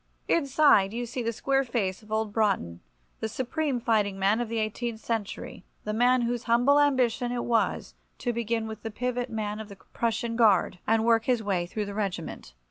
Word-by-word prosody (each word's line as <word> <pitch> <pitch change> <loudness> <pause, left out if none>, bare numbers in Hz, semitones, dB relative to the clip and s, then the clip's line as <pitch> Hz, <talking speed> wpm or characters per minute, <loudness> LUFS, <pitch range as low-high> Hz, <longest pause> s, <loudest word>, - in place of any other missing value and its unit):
Inside 275 -10 +4
you 240 +1 -3
see 245 +2 -4
the 230 0 -1
square 270 +4 +1
face 215 -7 -2
of 215 0 -17
old 220 -1 -1
Broughton, 195 - 0 0.4
the 220 - -2
supreme 260 +3 -2
fighting 215 -5 +1
man 200 +4 +2
of 240 - -3
the 230 - -2
eighteenth 220 +1 -2
century, 220 -4 -4 0.2
the 210 - -3
man 245 +3 +3
whose 240 0 -2
humble 245 +5 +4
ambition 255 -4 +2
it 245 -1 -2
was 230 -2 0 0.2
to 240 - -2
begin 230 -1 -1
with 220 -1 -7
the 225 - -4
pivot 245 +2 -2
man 215 -1 -3
of 220 -1 -8
the 200 - -10
Prussian 230 +3 -3
Guard, 205 -5 +3
and 225 0 +3
work 230 -1 +3
his 245 -3 +1
way 185 -4 -1
through 210 +3 -3
the 200 - -6
regiment. 180 - -4
225 Hz, 195 wpm, -27 LUFS, 210-245 Hz, 0.4 s, Inside